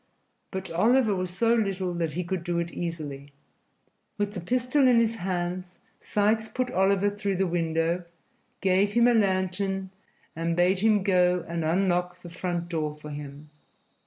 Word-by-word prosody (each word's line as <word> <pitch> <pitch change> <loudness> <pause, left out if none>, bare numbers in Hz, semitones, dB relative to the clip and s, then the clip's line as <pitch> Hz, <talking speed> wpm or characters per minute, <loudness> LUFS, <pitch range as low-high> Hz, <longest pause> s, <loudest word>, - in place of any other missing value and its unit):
But 190 -1 -5
Oliver 220 +5 +3
was 185 -1 -2
so 230 +6 +2
little 195 -5 0
that 165 -3 -2
he 180 - -2
could 175 0 -3
do 175 -1 -2
it 170 0 -2
easily. 145 -5 -5 0.8
With 205 0 -1
the 190 - -4
pistol 255 - +2
in 245 -2 +5
his 230 0 +2
hand, 180 -1 -2 0.3
Sikes 215 +2 +1
put 250 +2 -2
Oliver 195 +1 +2
through 205 -1 -2
the 190 +1 +1
window, 170 0 0 0.6
gave 195 +1 +2
him 235 +1 +5
a 245 - +5
lantern 190 -2 0 0.4
and 165 +1 -1
bade 180 +2 +3
him 210 -1 +3
go 180 -3 +2
and 170 -1 -3
unlock 180 +1 +1
the 180 -1 -11
front 175 0 -3
door 155 -3 -3
for 150 0 -10
them. 145 0 -9
185 Hz, 160 wpm, -27 LUFS, 170-205 Hz, 0.8 s, in